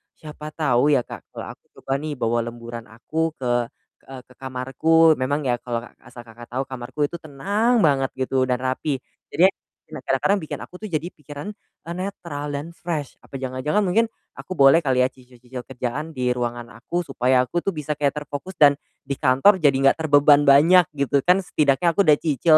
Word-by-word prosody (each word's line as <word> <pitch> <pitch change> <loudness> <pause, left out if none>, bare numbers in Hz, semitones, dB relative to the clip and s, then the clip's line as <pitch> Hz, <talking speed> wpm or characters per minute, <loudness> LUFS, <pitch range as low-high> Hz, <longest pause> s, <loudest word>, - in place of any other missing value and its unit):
siapa 150 0 -10
tahu 145 -2 +2
ya 135 - +3
Kak, - - -10
kalau - - -7
aku - - -55 0.2
coba - - -7
nih 150 +1 -4
bawa 115 +1 +1
lemburan 120 0 -8
aku 160 +8 -3
ke, 130 - -6 0.6
e 135 - -11 0.2
ke - - -17
kamarku, 135 +5 +2
memang 140 +3 0
ya 125 -2 0
kalau 120 -1 -3
a 120 - -12 0.2
asal 120 0 -11
Kakak 115 +1 -13
tahu, 130 +2 -1
kamarku 130 +2 -8
itu 170 - -6
tenang 205 - 0
banget 135 -3 +3
gitu, 130 0 0
dan 125 -1 -1
rapi. 130 +3 -1 0.3
Jadinya 185 +3 +4 0.4
memang - - -9
kadang-kadang 200 +1 +2
bikin 155 - -6
aku - - -14
tuh - - -3
jadi 160 -3 -2
pikiran, 145 +3 -10 0.4
e - - -11
netral 170 -6 -5
dan 150 +4 -5
fresh. 165 -5 -5
Apa - - -14
jangan-jangan 130 +9 -1
mungkin 220 +5 +2 0.3
aku - - -11
boleh 135 +1 +6
kali 130 -5 +2
ya - - +3
cicil-cicil 125 0 -11
kerjaan 135 +5 -5
di 125 -1 0
ruangan 120 -1 -3
aku, 175 +9 -3
supaya 130 -4 +2
aku 175 +7 -2
tuh 195 +1 -3
bisa 150 -1 -4
kayak 140 -1 +1
terfokus 145 +6 -7
dan 145 -3 +7 0.3
di 140 0 -4
kantor 135 +10 +4
jadi 145 -4 +4
enggak 135 0 +4
terbeban 145 -2 +5
banyak, 160 +6 +7
gitu 140 0 +1
kan 180 +2 +5
setidaknya 150 -1 +1
aku 200 +5 +2
udah 150 - +7
cicil 155 +1 +4
140 Hz, 190 wpm, -22 LUFS, 130-160 Hz, 0.6 s, dan